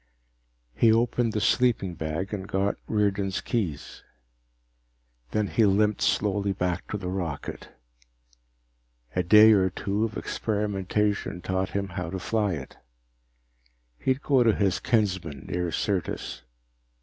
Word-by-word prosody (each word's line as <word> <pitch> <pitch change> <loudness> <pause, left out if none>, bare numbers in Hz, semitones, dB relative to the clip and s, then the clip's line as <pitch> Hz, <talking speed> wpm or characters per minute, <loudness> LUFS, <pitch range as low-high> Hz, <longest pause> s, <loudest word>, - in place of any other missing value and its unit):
He 115 - +4
opened 115 +1 +2
the 105 - -1
sleeping 115 -6 +2
bag 80 +5 -4
and 95 -2 -4
got 100 +1 0
Riordan's 100 -2 0
keys. 90 -12 -3 1.3
Then 105 - 0
he 110 - +1
limped 105 +2 +2
slowly 100 -1 +1
back 90 -2 -2
to - - -3
the 95 -3 -6
rocket. 90 -5 -4 1.5
A 90 - +2
day 105 +5 +7
or 95 -3 +4
two 100 +4 -2
of 115 -1 -2
experimentation 105 -2 -1
taught 95 +1 -2
him 100 -1 -2
how 90 -2 -4
to 95 - -4
fly 100 +2 0
it. 70 -5 -7 1.2
He'd 130 +2 0
go 135 -3 +3
to 115 -3 +4
his 95 -2 +1
kinsmen 95 - -1
near 90 -1 -2
Syrtis. 90 -9 -2
100 Hz, 125 wpm, -26 LUFS, 90-105 Hz, 1.5 s, day